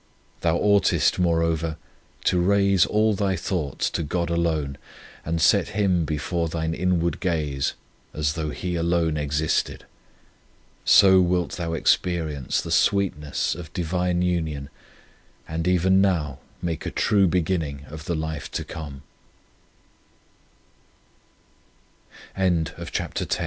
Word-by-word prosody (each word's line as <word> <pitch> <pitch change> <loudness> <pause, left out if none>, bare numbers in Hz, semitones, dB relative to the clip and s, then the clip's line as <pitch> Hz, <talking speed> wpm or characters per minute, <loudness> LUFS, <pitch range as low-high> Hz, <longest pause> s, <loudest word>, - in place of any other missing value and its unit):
Thou 85 0 +2
oughtest, 100 -1 +3
moreover, 85 -2 +1 0.5
to 90 - +2
raise 100 -1 +3
all 110 +1 +2
thy 95 -1 0
thoughts 80 -5 -2
to - - -2
God 85 +2 -2
alone, 80 -5 -1 0.4
and 80 +1 -2
set 80 - +4
Him 95 -5 +2
before 80 +2 -2
thine 80 0 -2
inward 85 -1 0
gaze, 75 -7 -1 0.4
as 75 -1 -1
though 80 -1 -3
He 90 +4 -4
alone 85 -1 +1
existed. 75 +1 -1 1.0
So 95 -1 +7
wilt 90 -1 +1
thou 85 -2 -3
experience 80 -4 0
the - - -7
sweet 100 -2 +2
ness 75 -1 -2
of 80 -1 -9
Divine 90 0 0
union 80 -6 -2 0.8
and 80 +2 -3
even 95 +1 +4
now 80 -9 0 0.2
make 85 -3 -3
a - - 0
true 100 -3 +3
beginning 80 -5 -1
of 80 +1 -8
85 Hz, 105 wpm, -24 LUFS, 80-90 Hz, 1.0 s, So